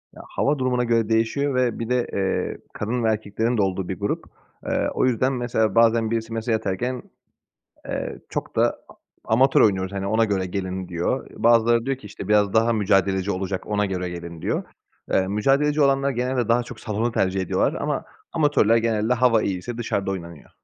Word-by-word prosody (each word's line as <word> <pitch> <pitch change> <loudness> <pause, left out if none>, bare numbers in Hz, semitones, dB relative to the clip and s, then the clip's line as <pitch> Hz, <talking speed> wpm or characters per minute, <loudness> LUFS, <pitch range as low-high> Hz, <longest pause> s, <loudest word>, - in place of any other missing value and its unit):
Ya, - - -10
hava 145 0 0
durumuna 125 -1 +1
göre 115 -2 +1
değişiyor 115 +5 +1
ve 125 -2 +1
bir 115 0 -4
de, 125 -1 +1
eee, 95 -1 -1 0.2
kadın 115 +3 -2
ve 110 - +3
erkeklerin 110 +2 -1
de - - +3
olduğu 95 -1 -1
bir 95 - -4
grup. 100 0 -2 0.4
Eee, - - 0
o - - +1
yüzden 130 +1 +1
mesela 115 -4 0
bazen 115 -1 +4
birisi 115 0 -2
mesaj 115 0 0
atarken, 110 +4 -2 0.8
eee, - - -4
çok - - -5
da - - +2
a - - -14 0.4
amatör 130 +3 +5
oynuyoruz, 95 -3 +2
hani, 100 0 -3
ona 110 +2 +3
göre 100 -3 -1
gelin, 95 0 -4
diyor. 90 +9 -2
Bazıları 115 0 +4
diyor 135 -1 -1
ki 115 - -11
işte, 100 -1 -8
biraz 105 -1 +3
daha 115 +1 +3
mücadeleci 95 -2 +1
olacak, 95 0 -3
ona 105 -1 +1
göre 90 -2 -3
gelin, 85 -1 -8
diyor. - - -1 0.5
Eee, 95 - +2
mücadeleci 140 +9 +2
olanlar 135 0 +3
genelde 125 -1 -1
daha 120 +1 +3
çok - - -10
salonu 110 +2 -2
tercih 95 -3 0
ediyorlar 95 - +1
ama - - -1 0.3
amatörler 145 -8 +3
genelde 115 0 +1
hava 120 -2 +3
iyiyse 100 +5 -3
dışarıda 100 -4 -2
oynanıyor. 85 -5 -8
110 Hz, 185 wpm, -23 LUFS, 95-120 Hz, 0.8 s, amatör